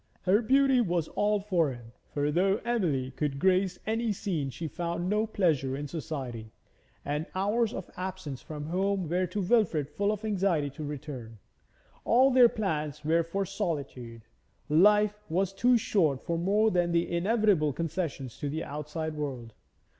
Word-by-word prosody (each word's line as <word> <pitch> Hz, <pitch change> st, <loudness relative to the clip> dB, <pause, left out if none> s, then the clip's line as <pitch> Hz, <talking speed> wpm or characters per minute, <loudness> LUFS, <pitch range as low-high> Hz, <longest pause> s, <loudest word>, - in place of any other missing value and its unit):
Her 195 Hz, +4 st, +4 dB
beauty 270 Hz, +2 st, +4 dB
was 175 Hz, -6 st, 0 dB
all 210 Hz, 0 st, +1 dB
for 180 Hz, -7 st, +1 dB
him, 120 Hz, -2 st, -10 dB, 0.2 s
for 145 Hz, 0 st, 0 dB
though 190 Hz, +5 st, +3 dB
Emily 165 Hz, -, 0 dB
could 140 Hz, +1 st, -2 dB
grace 185 Hz, +2 st, +2 dB
any 225 Hz, +1 st, 0 dB
scene 170 Hz, -8 st, -2 dB
she 160 Hz, +6 st, -5 dB
found 170 Hz, +3 st, -3 dB
no 210 Hz, +3 st, +1 dB
pleasure 150 Hz, -11 st, +1 dB
in 145 Hz, +1 st, -4 dB
society, 135 Hz, -8 st, -6 dB, 0.5 s
and 150 Hz, +2 st, -2 dB
the -, -, -9 dB
hours 215 Hz, +4 st, +1 dB
of 190 Hz, -, -6 dB
absence 185 Hz, -7 st, -5 dB
from 150 Hz, -1 st, -7 dB
home 190 Hz, +2 st, 0 dB
were 180 Hz, +3 st, 0 dB
to 195 Hz, +3 st, -3 dB
Wilfrid 180 Hz, -, +2 dB
full 200 Hz, +7 st, 0 dB
of 215 Hz, +1 st, -4 dB
anxiety 185 Hz, -8 st, +1 dB
to 145 Hz, +3 st, -8 dB
return. 140 Hz, -6 st, -7 dB, 0.7 s
All 260 Hz, +4 st, +5 dB
their 250 Hz, -2 st, +7 dB
plans 155 Hz, -, -3 dB
were 165 Hz, +2 st, +3 dB
for 195 Hz, +4 st, -2 dB
solitude; 130 Hz, -10 st, -4 dB, 0.5 s
life 210 Hz, +6 st, +4 dB
was 190 Hz, +3 st, 0 dB
too 245 Hz, +5 st, +4 dB
short 160 Hz, -, +1 dB
for 170 Hz, -, -1 dB
more 205 Hz, +6 st, +2 dB
than 175 Hz, -2 st, +1 dB
the 170 Hz, 0 st, +2 dB
inevitable 195 Hz, -5 st, +2 dB
concessions 155 Hz, -5 st, -4 dB
to 145 Hz, -, -2 dB
the 160 Hz, +3 st, -3 dB
outside 150 Hz, +2 st, -4 dB
world. 130 Hz, -7 st, -5 dB
170 Hz, 160 wpm, -29 LUFS, 150-200 Hz, 0.7 s, their